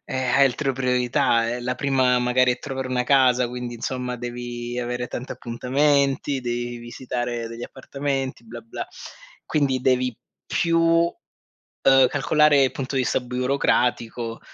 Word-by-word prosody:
eh, - - -5
hai 130 +1 +3
altre 135 +1 0
priorità, 125 -1 +1
è 120 +1 -3
la 125 +1 -2
prima 130 -2 +2
magari 125 0 +2
trovare 130 -1 -5
una 125 -1 0
casa, 125 -2 +4
quindi 125 0 -5
insomma 125 +1 -4
devi 120 0 -5
avere 125 0 -3
tanti 125 +1 -6
appuntamenti, 140 +3 +1
devi 120 0 -3
visitare 120 0 -4
degli 115 +1 -8
appartamenti, 135 -1 -4
"bla-bla". 115 0 -7 0.6
Quindi 140 -4 +1
devi 125 -1 +1 0.3
più, 165 0 +1
uhm, 165 +1 +3 0.9
calcolare 145 +1 +4
il 130 - +3
punto 135 0 -5
di 130 - +2
vista 125 - 0
burocratico 125 -2 0
125 Hz, 130 wpm, -23 LUFS, 120-135 Hz, 0.9 s, casa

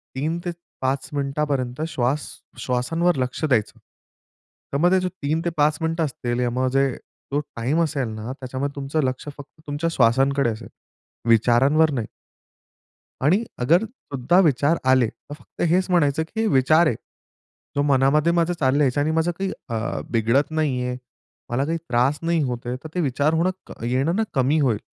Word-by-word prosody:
3 155 +5 -1
ते 175 - -1 0.3
5 130 +1 -1
मिनिटापर्यंत 140 -2 -2
श्वास 135 -1 -1 0.3
श्वासांवर 165 +8 0
लक्ष 130 +3 -3
द्यायचं. 125 -8 0 0.9
त्यामध्ये 175 +7 +3
जो 185 0 -1
3 160 -3 -2
ते - - +2
5 150 0 +3
मिनिट 165 +1 -1
असतील 125 -4 -1
म्हणजे 130 +2 +1 0.4
जो 145 - +2 0.2
टाईम 130 +8 0
असेल 140 -5 -1
ना 110 +2 -6
त्याच्यामध्ये 135 +2 -4
तुमचं 140 +2 -1
लक्ष 130 0 -2
फक्त 145 +2 -13
तुमच्या 145 +3 -1
श्वासांकडे 135 +2 +3
असेल. 115 +1 -6 0.6
विचारांवर 130 +8 +4
नाही. 120 -6 -2 1.1
आणि 180 - +3 0.2
अगर 170 - +4
सुद्धा 175 - -1
विचार 155 -1 +3
आले 130 -3 +4
तर 145 - -11
फक्त 150 - -9
हेच 185 +2 +2
म्हणायचं 160 -4 +3
की 220 +8 -5
हे 225 - +1
विचार 155 0 +4
आहे, 120 - +1 0.8
तो 145 - +3
मनामध्ये 145 +3 +3
माझं 170 0 +2
चालल्याचं 140 0 +2
आणि 150 +2 +1
माझं 160 +2 +1
काही 195 0 -1 0.2
अ, 115 -1 -2
बिघडत 115 +6 +2
नाहीये. 130 -6 -1 0.5
मला 125 +3 0
काही 165 +2 -1
त्रास 125 +5 +2
नाही 165 -1 +1
होत 125 -3 -3
आहे. 125 +1 -2
तर - - -6
ते 180 - 0
विचार 145 +1 +1
होणं 170 +3 +2 0.4
येणं 135 +8 +1
ना, 220 - +2
क 220 - -4
कमी 135 +4 +3
होईल. 125 -7 +2
140 Hz, 160 wpm, -23 LUFS, 125-160 Hz, 1.1 s, विचारांवर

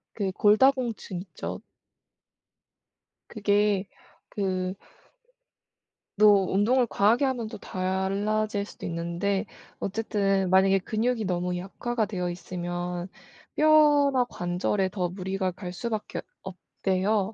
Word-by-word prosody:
그 200 -3 -1
골다공증 215 -2 +2
있죠. 185 - -7 1.7
그게 205 -2 +1 0.4
그 185 -2 -2 1.4
너 210 +1 +7
운동을 205 +5 +4
과하게 225 +8 +3
하면 250 -4 -1
또 - - -8
달라질 200 +3 -1
수도 - - -10
있는데 170 +4 -1 0.3
어쨌든 195 -2 0
만약에 195 +1 +5
근육이 225 +3 -1
너무 180 -1 -1
약화가 220 +5 -2
되어 180 -4 -3
있으면 175 0 -4 0.5
뼈나 295 -4 +5
관절에 185 -1 -1
더 180 -2 -2
무리가 190 +1 -2
갈 180 0 -7
수밖에 215 +3 -4 0.2
없대요. 190 +5 -1
195 Hz, 220 characters per minute, -27 LUFS, 185-215 Hz, 1.7 s, 너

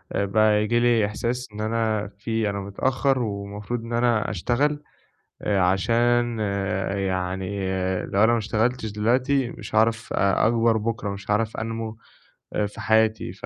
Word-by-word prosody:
بقى 105 +1 +3
ييجي 115 +3 +1
لي 120 -3 +3
إحساس 120 +4 -3
إن 105 - -6
أنا 110 -1 0
في 110 -1 -1
أنا 100 0 -3
متأخّر، 130 +7 0
والمفروض 105 +1 -4
إن 115 - -6
أنا 120 -3 +2
أشتغل، 140 - 0 0.6
عشان 115 +5 +2 0.6
يعني 95 -1 -2 0.6
لو 100 +2 +2
أنا 115 - +4
ما 120 - +2
اشتغلتش 110 +2 -1
دلوقتي، 125 +4 +1
مش - - -9
هاعرف 110 +1 +2
أ 100 +2 +2
أكبر 115 0 +3
بُكره، 110 -1 -2
مش 100 +1 -7
هاعرف 110 +1 0
أنمو 115 0 -4 0.6
آآ 105 - +1
في 105 +2 -10
حياتي. 110 -3 +2
ف 95 - -10
110 Hz, 145 wpm, -24 LUFS, 105-120 Hz, 0.6 s, أنا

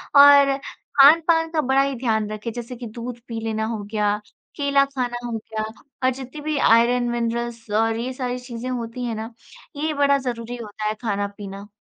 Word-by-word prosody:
और 280 -1 +8 0.5
खान-पान 325 +3 +6
का 315 -2 +1
बड़ा 265 +1 +3
ही 275 -1 0
ध्यान 220 -4 0
रखें। 215 +2 -4
जैसे 240 +2 -6
कि 240 0 -8
दूध 235 +2 -7
पी 230 -1 -4
लेना 220 0 -1
हो 220 -2 -3
गया, 210 -1 +1 0.4
केला 280 -1 +3
खाना 250 -3 -3
हो 240 - -4
गया 215 0 -5 0.4
और 255 - +5
जितनी 260 +3 -7
भी 305 0 -1
आयरन, 240 0 +4
मिनरल्स 235 -1 -3
और 225 +1 +2
ये 250 +3 -3
सारी 250 -1 -3
चीज़ें 245 0 -6
होती 245 0 -4
हैं 235 -2 -2
ना, 220 +2 -5 0.4
ये 305 +2 -1
बड़ा 280 -1 +3
ज़रूरी 245 -3 -4
होता 215 -2 -7
है 215 - 0
खाना-पीना। 200 -2 -4
240 Hz, 185 wpm, -23 LUFS, 225-275 Hz, 0.5 s, और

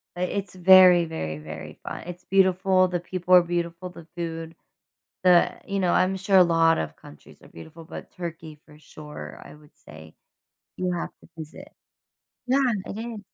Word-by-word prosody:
But 180 +1 -2
it's 200 -3 -4
very, 180 -1 +7
very, 80 - -5
very 75 0 -10
fun - - -7
it's 180 0 -9
beautiful, 185 -1 +3
the 175 -1 -2
people 180 +1 -2
are 180 - +8
beautiful, 175 +1 -4
the 170 -2 -13
food, 165 -1 -6 0.7
the 180 -1 +4
you 195 0 -2
know, 180 -2 +1
I'm 185 +1 +2
sure 190 0 +2
a 180 - +8
lot 165 -1 +3
of 80 - -4
countries 75 - -17
are - - -17
beautiful, 160 - -13
but 165 - -10
Turkey, 160 -3 -8
for 150 -1 -17
sure, 150 0 -11
I - - -13
would 150 0 -21
say 80 +1 -15 0.6
you 180 0 -2
have 170 - -4
to - - -19
visit. 155 -1 -10 0.8
Yeah, 260 +2 +2 0.3
it 205 - -7
is. 225 -2 -6
175 Hz, 175 wpm, -24 LUFS, 160-185 Hz, 0.8 s, are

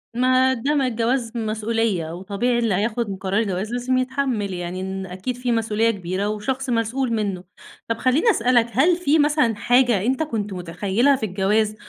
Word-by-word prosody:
ما 255 +1 +3
ده 270 +5 -1
ما 275 -3 +2
الجواز 235 0 -1
مسؤولية، 220 -5 -1
وطبيعي 205 +7 -1
اللي 230 -4 +1
هياخد 215 0 -1
قرار 195 +2 0
الجواز 200 0 -3
لازم 245 +1 0
يتحمل 255 -6 -1
يعني، 175 +1 -5
إن 190 0 -4
أكيد 190 +7 -5
في 245 0 -2
مسؤولية 225 0 +1
كبيرة 190 0 -3
وشخص 255 +6 -3
مسؤول 235 +2 0
منه. 200 -5 -2 0.4
طب 230 - -1
خليني 265 - +2
أسألَك، 245 - +3
هل 310 +9 +3
في 320 -3 +2
مثلًا 295 -6 +2
حاجة 245 -3 +2
أنتَ 265 +6 +1
كنت 210 -9 -3
متخيلها 190 +9 +1
في 240 - -3
الجواز 210 +2 0
230 Hz, 165 wpm, -22 LUFS, 200-255 Hz, 0.4 s, ما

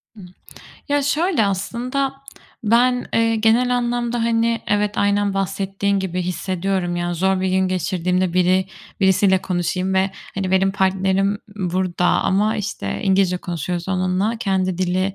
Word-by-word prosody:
Ih 210 - -12 0.7
Ya, 285 0 +2
şöyle 295 - +1
aslında, 250 +8 -2 0.5
ben, 245 +3 +3
eee, 225 0 +2
genel 235 +3 +3
anlamda, 240 -1 -1
hani, 230 0 +1
evet, 205 0 0
aynen 205 0 +1
bahsettiğin 195 +1 -1
gibi 185 -1 -2
hissediyorum. 180 0 -2
Yani 175 0 -2
zor 190 +2 +1
bir 190 - 0
gün 190 0 +2
geçirdiğimde 180 0 0
biri 185 +1 +2 0.3
birisiyle 190 0 +4
konuşayım 185 +1 -1
ve, 190 +1 +2 0.2
hani, 195 -1 -2
benim 190 +1 +3
partnerim 195 +1 +1 0.2
burada 180 -2 -1
ama, 210 +5 +2
işte, 210 0 -4
İngilizce 190 -2 +2
konuşuyoruz 175 0 -4
onunla. 185 +4 0
Kendi 185 -3 0
dili 185 +1 0
190 Hz, 135 wpm, -20 LUFS, 185-220 Hz, 0.7 s, birisiyle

